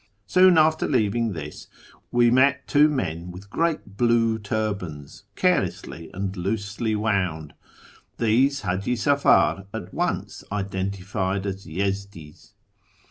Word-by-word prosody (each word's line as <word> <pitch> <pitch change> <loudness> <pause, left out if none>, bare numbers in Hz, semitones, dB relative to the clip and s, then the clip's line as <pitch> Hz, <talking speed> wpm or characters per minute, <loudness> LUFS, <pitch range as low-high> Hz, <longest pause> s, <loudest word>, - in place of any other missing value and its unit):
Soon 185 - +5
after 155 0 +3
leaving 115 -3 +1
this 75 -3 -8 0.4
we 120 -1 +4
met 130 +1 +3
two 150 +1 +5
men 90 - -3
with 95 +3 -11
great 155 -12 -2
Muc 115 -1 +2
turbans, 100 -9 -4
carelessly 85 0 -1
and 95 0 -4
loosely 105 +3 -2
wouml. 90 -8 -1 0.7
Tliese 125 +3 +2
H;iji 100 +7 -1
Safar 115 -8 +3
at - - -7
once - - -2
identified 95 0 -2
as 95 -1 -5
Yezdi's. 95 -3 -5
100 Hz, 110 wpm, -24 LUFS, 95-120 Hz, 0.7 s, Soon